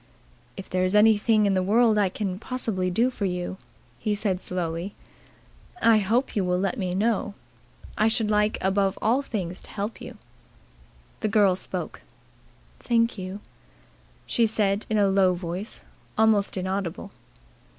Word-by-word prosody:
"If 195 - -7
there 185 0 0
is 185 +2 +1
anything 215 0 +4
in 200 - +2
the 185 - +2
world 215 +3 +3
I 200 -2 +3
can 190 -1 -4
possibly 220 -7 -2
do 230 +8 +2
for 215 -5 -3
you," 180 0 -3 0.4
he 210 -1 -1
said 195 -3 -1
slowly, 175 +1 -3 0.8
"I 230 -6 +5
hope 225 +6 0
you 200 - +1
will 180 0 +1
let 195 +5 -1
me 180 -2 -2
know. 210 0 0 0.6
I 215 - +4
should 220 -1 0
like 210 +1 +2
above 195 0 +1
all 240 +5 +2
things 185 -9 -4
to - - -15
help 205 +2 -5
you." - - -9 1.0
The 215 - -1
girl 205 -3 +4
spoke. - - -5 0.8
"Thank 230 -2 +1
you," 185 +2 -6 0.8
she 230 -1 +2
said 205 -1 0
in 220 - +1
a 205 -1 +4
low 190 -2 +3
voice 175 +4 -6 0.3
almost 215 -3 +3
inaudible. 190 +1 -3
200 Hz, 150 wpm, -25 LUFS, 185-220 Hz, 1.0 s, I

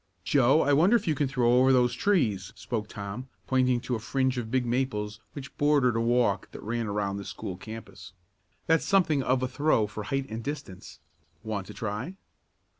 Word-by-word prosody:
"Joe, 135 - +4
I 145 - +2
wonder 175 +11 +5
if 220 -5 0
you 160 - +3
can 145 -1 0
throw 125 -2 +3
over 130 +1 +5
those 125 -2 +3
trees," 120 - +1
spoke 110 -3 -4
Tom, 105 +5 -7 0.2
pointing 130 -1 +2
to 125 - -4
a 115 - 0
fringe 130 +3 0
of 115 -2 -5
big 130 0 +1
maples 115 -4 -2
which 140 -1 -9
bordered 145 -5 +3
a 115 - +1
walk 120 -3 +1
that - - -9
ran 115 +1 -2
around 100 -1 -2
the 100 - -5
school 95 - -6
campus. 110 0 -10 0.5
"That's 165 -1 +3
something 175 -8 +2
of 130 0 +1
a - - +1
throw 130 -4 +2
for 105 0 -7
height 135 +4 -2
and 110 +1 -6
distance. 125 -10 -7 0.4
Want 105 -4 -4
to - - -10
try?" 115 - -4
125 Hz, 190 wpm, -28 LUFS, 110-135 Hz, 0.5 s, wonder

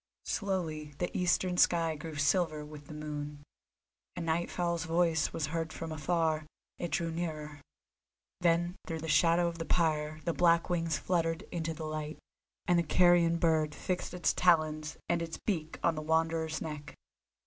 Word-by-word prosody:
Slowly 160 -7 -2
the 175 - -3
eastern 180 0 +1
sky 165 -3 +3
grew 155 +1 -7
silver 150 +1 +1
with 150 -1 -11
the 155 - -8
moon. 150 -1 -5 0.7
A 175 - -4
night 165 +1 0
fowl's 170 -2 -1
voice 165 -1 +2
was 155 - -1
heard 165 -1 -1
from 165 0 -6
afar, 155 -1 0 0.3
it 175 - -2
drew 165 0 -1
nearer; 155 -3 -4 0.8
then 175 +1 +2
through 160 -1 -3
the 160 - -5
shadow 165 +3 +4
of 170 0 -4
the - - -1
pyre 155 -3 +1
the 170 - +1
black 170 0 +3
wings 165 -2 +1
fluttered 165 0 0
into 165 -2 -2
the 155 - -5
light, 155 0 -4 0.5
and 175 -1 +4
the - - +2
carrion 170 0 +4
bird 160 -3 +2
fixed 180 0 -3
its 180 - +2
talons 155 -3 +2
and 170 -1 +1
its 165 -1 -4
beak 160 -6 -2
on 170 - +4
the 155 - -4
Wanderer's 160 0 0
neck. 150 -2 -6
165 Hz, 165 wpm, -32 LUFS, 155-170 Hz, 0.8 s, shadow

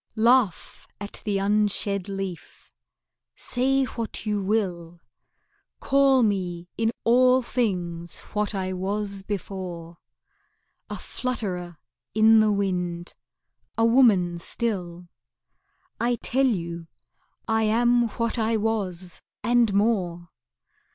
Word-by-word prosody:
Laugh 230 -4 +2
at 205 0 -6
the 205 -2 0
unshed 200 -1 0
leaf, 195 -3 -7 0.6
say 270 +2 +1
what 230 -3 -4
you 210 -1 0
will, 180 -5 -2 0.8
Call 275 -2 +4
me 180 -5 -1
in 225 0 +1
all 255 +2 +4
things 175 -9 -2
what 210 0 -1
I 185 -1 -2
was 200 +1 -2
before, 180 -4 -6 0.9
A - - -4
flutterer 185 -9 -4 0.4
in 220 0 +6
the 215 -1 +4
wind, 180 -3 -2 0.6
a 225 - +3
woman 210 -8 +4
still; 180 -4 -3 0.9
I 240 +1 +1
tell 265 +3 +1
you 170 -6 -3 0.6
I 220 0 +2
am 240 +2 +3
what 230 +1 -1
I 225 0 +1
was 190 -5 -3 0.2
and 235 -1 +3
more. 185 -5 0
205 Hz, 105 wpm, -25 LUFS, 180-230 Hz, 0.9 s, in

